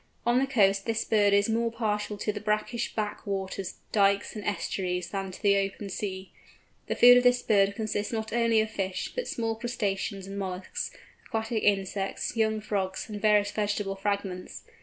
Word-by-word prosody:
On 240 +1 +4
the 270 - +1
coast 200 -6 +3
this 225 0 0
bird 205 -2 +3
is 200 0 +4
more 230 +1 +1
partial 210 -2 -2
to 210 - -2
the 210 - -4
brackish 215 +2 -1
back 210 -1 -3
waters, 195 -1 -3 0.2
dykes, 200 0 +2
and 210 - -5
estuaries, 180 -2 -2
than 195 -1 -3
to 185 - -9
the 200 -1 +4
open 195 0 -3
sea. 190 -1 -4 0.6
The - - -1
food 245 0 +9
of 250 - +4
this 245 0 +4
bird 200 -2 +3
consists 215 -2 -2
not 220 -1 -3
only 230 -2 +3
of 220 0 -3
fish, 190 -3 -3
but - - -3
small 225 -1 -1
crustaceans 200 -4 -2
and 195 +1 -6
molluscs, 185 -1 -4 0.4
aquatic 225 0 -2
insects, 195 0 0
young 220 -1 +1
frogs, 195 -1 -2
and 205 -1 -5
various 210 -1 +4
vegetable 205 -2 -1
fragments. 195 -2 -3
205 Hz, 180 wpm, -28 LUFS, 195-220 Hz, 0.6 s, food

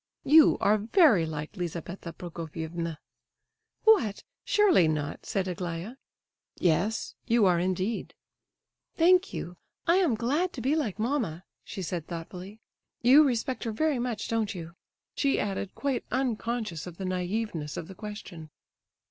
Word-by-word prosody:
"You 305 +2 +7
are 210 +1 +4
very 220 - +4
like 150 -1 -5
Lizabetha 175 0 -5
Prokofievna." 165 -1 -5 0.9
"What! 260 - +4 0.2
surely 390 - +4
not?" 150 -2 -3
said 190 -1 -1
Aglaya. 175 +3 -4 0.6
"Yes, 185 +6 +1
you 230 -3 +4
are, 180 -2 +4
indeed." 185 +5 -2 0.8
"Thank 365 +3 +4
you; 175 +1 -6 0.3
I 340 +2 +4
am 340 -11 +3
glad 290 +11 0
to - - -6
be 270 +6 +2
like 250 - -1
mamma," 220 - -1 0.2
she 190 - -6
said, 170 -1 -4
thoughtfully. 180 +4 -8 0.4
"You 270 +6 +8
respect 255 -1 -1
her 225 - -1
very 285 +4 0
much, 240 -3 -3
don't 225 -3 -1
you?" 170 -1 -7 0.4
she 280 -1 +1
added, 195 -1 -3
quite 275 -3 -1
unconscious 230 - -2
of 170 -2 -9
the 190 - -5
naiveness 185 -3 -2
of 160 - -5
the 190 - -9
question. 195 -6 -8
205 Hz, 140 wpm, -28 LUFS, 170-250 Hz, 0.9 s, You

